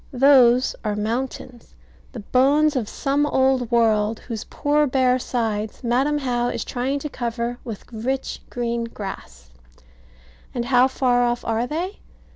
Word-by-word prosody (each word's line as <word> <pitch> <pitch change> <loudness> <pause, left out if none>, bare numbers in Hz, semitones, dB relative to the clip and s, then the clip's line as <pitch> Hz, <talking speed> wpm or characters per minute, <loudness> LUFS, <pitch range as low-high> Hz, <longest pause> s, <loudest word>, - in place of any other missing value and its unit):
Those 255 -2 +5
are 210 -2 -1
mountains; 240 +2 -4 0.4
the 235 - -7
bones 285 +7 +3
of 235 -5 -1
some 285 +1 0
old 265 -3 +2
world, 220 -2 +2
whose 225 -3 -6
poor 295 0 +1
bare 255 -1 +2
sides 220 -3 -3
Madam 265 +5 +1
How 245 -3 -1
is - - -3
trying 260 +3 -2
to 300 - -3
cover 240 -2 -3
with 225 -5 -7
rich 260 +4 -3
green 235 -1 -2
grass. 65 - -9 1.0
And 240 -1 -1
how 250 0 +4
far 250 -2 +1
off 240 0 0
are 230 +2 0
they? 350 +8 -4
245 Hz, 140 wpm, -22 LUFS, 230-265 Hz, 1.0 s, Those